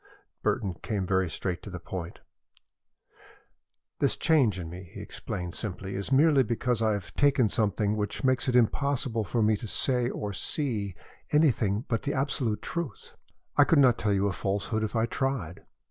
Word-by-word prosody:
Burton 95 Hz, -3 st, 0 dB
came 100 Hz, -4 st, -2 dB
very 95 Hz, -1 st, +1 dB
straight 90 Hz, +2 st, -3 dB
to -, -, -9 dB
the 90 Hz, -, -6 dB
point. 85 Hz, -1 st, -7 dB, 1.8 s
"This -, -, +2 dB
change 135 Hz, -, +3 dB
in 85 Hz, -, -5 dB
me," 90 Hz, +1 st, -9 dB
he -, -, -9 dB
explained 90 Hz, -1 st, -5 dB
simply, 95 Hz, -2 st, -5 dB
"is 100 Hz, +5 st, -4 dB
merely 145 Hz, +1 st, +5 dB
because 120 Hz, 0 st, 0 dB
I 110 Hz, -1 st, +3 dB
have 100 Hz, -3 st, -5 dB
taken 135 Hz, -6 st, +3 dB
something 105 Hz, 0 st, +1 dB
which 105 Hz, +4 st, -3 dB
makes 130 Hz, -1 st, +2 dB
it 125 Hz, -, +1 dB
impossible 125 Hz, -1 st, +1 dB
for 115 Hz, +2 st, 0 dB
me 110 Hz, 0 st, +4 dB
to 115 Hz, -, -7 dB
say 125 Hz, +1 st, +1 dB
or 105 Hz, -5 st, -4 dB
see 105 Hz, -, -2 dB, 0.4 s
anything 120 Hz, -8 st, +2 dB
but 115 Hz, -, 0 dB
the 140 Hz, -, -2 dB
absolute 135 Hz, -5 st, -1 dB
truth. 170 Hz, -5 st, -5 dB, 0.4 s
I 145 Hz, -, +8 dB
could 160 Hz, -, +3 dB
not 130 Hz, -4 st, +5 dB
tell 105 Hz, -, +1 dB
you 100 Hz, 0 st, +2 dB
a 100 Hz, -, 0 dB
falsehood 100 Hz, +3 st, -1 dB
if 110 Hz, +2 st, -3 dB
I 110 Hz, 0 st, +3 dB
tried. 115 Hz, -8 st, -3 dB
110 Hz, 175 wpm, -28 LUFS, 100-130 Hz, 1.8 s, I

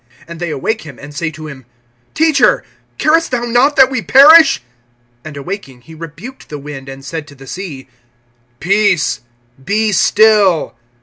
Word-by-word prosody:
And 170 Hz, -1 st, -10 dB
they 175 Hz, -1 st, -4 dB
awake 215 Hz, +10 st, -3 dB
him, 140 Hz, -5 st, -12 dB
and 145 Hz, +1 st, -12 dB
say 155 Hz, +2 st, -3 dB
to 155 Hz, 0 st, -10 dB
him: 140 Hz, -3 st, -11 dB, 0.5 s
Teacher, 315 Hz, -2 st, +2 dB, 0.3 s
carest 325 Hz, +2 st, +1 dB
thou 245 Hz, -2 st, -2 dB
not 245 Hz, +5 st, +2 dB
that 265 Hz, 0 st, +5 dB
we 255 Hz, -4 st, -2 dB
perish? 275 Hz, -, +6 dB, 0.6 s
(39)And 150 Hz, -2 st, -10 dB
awaking, 140 Hz, -5 st, -8 dB
he 160 Hz, -, -15 dB
rebuked 165 Hz, -, -11 dB
the 150 Hz, -, -6 dB
wind, 140 Hz, -2 st, -9 dB
and 135 Hz, 0 st, -11 dB
said 160 Hz, 0 st, -6 dB
to 145 Hz, -, -15 dB
the 135 Hz, 0 st, -14 dB
sea: 145 Hz, -4 st, -8 dB, 0.7 s
Peace, 195 Hz, -4 st, +1 dB, 0.4 s
be 215 Hz, +7 st, 0 dB
still. 210 Hz, -4 st, +3 dB
175 Hz, 160 wpm, -14 LUFS, 145-220 Hz, 0.7 s, perish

